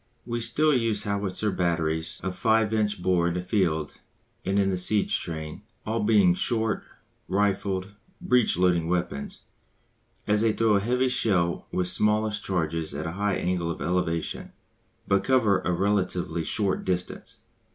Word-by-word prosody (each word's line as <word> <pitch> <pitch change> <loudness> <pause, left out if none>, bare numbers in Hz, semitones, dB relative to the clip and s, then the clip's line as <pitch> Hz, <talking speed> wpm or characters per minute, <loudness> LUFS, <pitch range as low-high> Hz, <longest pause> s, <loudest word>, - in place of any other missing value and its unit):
We 120 -1 -2
still 150 +7 +3
use 115 -5 +1
howitzer 100 0 -1
batteries 80 -3 -1
of 95 -1 -3
5 110 -2 +2
inch 105 -4 0
bore 90 -2 +2
in 85 - -1
the 90 - -1
field 85 -6 -1 0.4
and 95 +1 0
in 100 -1 +2
the - - 0
siege 100 +3 +1
train, 80 -2 -6 0.2
all 110 +1 -1
being 105 -4 +4
short, 110 +3 0 0.5
rifled, 95 0 0 0.3
breech 125 - +2
loading 90 -2 +2
weapons, 85 -5 -3 0.8
as 105 0 +2
they 110 -1 +3
throw 110 -1 +3
a - - +4
heavy 125 +5 +1
shell 95 -9 +1
with 90 - 0
smallish 105 +2 +1
charges 80 -6 -2
at 75 +2 -4
a 80 - -3
high 100 +2 -1
angle 90 -1 -1
of 85 - -4
elevation, 85 -1 -2 0.5
but 95 0 +2
cover 115 -7 +3
a 90 - -2
relatively 90 -2 0
short 100 +3 -1
distance. 90 -1 -4
95 Hz, 150 wpm, -26 LUFS, 85-105 Hz, 0.8 s, being